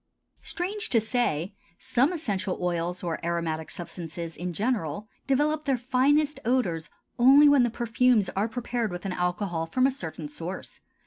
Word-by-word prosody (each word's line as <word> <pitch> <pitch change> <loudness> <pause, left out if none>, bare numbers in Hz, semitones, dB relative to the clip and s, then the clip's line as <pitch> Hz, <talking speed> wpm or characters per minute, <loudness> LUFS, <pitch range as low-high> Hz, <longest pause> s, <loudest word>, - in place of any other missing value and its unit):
Strange 410 +5 -2
to 230 - +4
say, 215 - -1 0.2
some 260 +6 +1
essential 200 - -2
oils 175 0 -2
or 170 -1 -3
aromatic 165 -2 -2
substances 170 -1 -6
in 180 +1 -4
general, 205 - -2 0.2
develop 295 +3 +1
their 270 -3 +2
finest 280 +5 +2
odors 185 -11 0 0.3
only 275 +4 +8
when 285 -2 +6
the 240 - +3
perfumes 235 -2 +2
are 200 +3 0
prepared 235 -2 -2
with 175 +2 -6
an 190 - -2
alcohol 180 -2 -1
from 255 +10 +2
a 270 - +4
certain 165 - -6
source. 170 +5 -7
210 Hz, 150 wpm, -27 LUFS, 170-255 Hz, 0.3 s, only